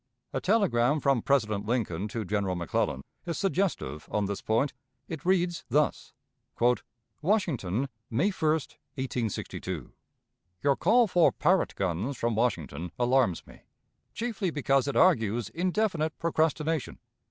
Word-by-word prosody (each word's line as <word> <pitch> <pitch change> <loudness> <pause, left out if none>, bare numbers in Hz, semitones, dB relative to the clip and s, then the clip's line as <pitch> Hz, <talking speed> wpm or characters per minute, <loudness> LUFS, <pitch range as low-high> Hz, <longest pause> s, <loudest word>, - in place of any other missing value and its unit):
A - - -1
telegram 155 - +3
from 135 -4 +2
President 110 -7 +1
Lincoln 105 -6 -1
to 110 0 -4
General 100 -1 0
McClellan 85 -5 -1 0.2
is 170 - -2
suggestive 185 - -1
on 105 -1 0
this 100 0 -3
point. 115 +6 +1 0.3
It 160 -3 -6
reads 175 -2 +1
thus: 145 +4 0 1.1
"WASHINGTON, 140 - 0 0.2
May 145 - +2
1, 155 -5 +1
1862. 120 - -4 0.7
"Your 140 -1 +4
call 230 - +4
for 180 -5 +4
Parrott 185 +4 +2
guns 95 +8 -2
from 115 0 0
Washington 90 -8 -1
alarms 125 -6 +2
me - - -16 0.5
chiefly 225 -4 -2
because 135 -3 +1
it 140 - -2
argues 115 - +3
indefinite 175 - 0
procrastination. 160 -2 0
135 Hz, 120 wpm, -28 LUFS, 105-170 Hz, 1.1 s, Your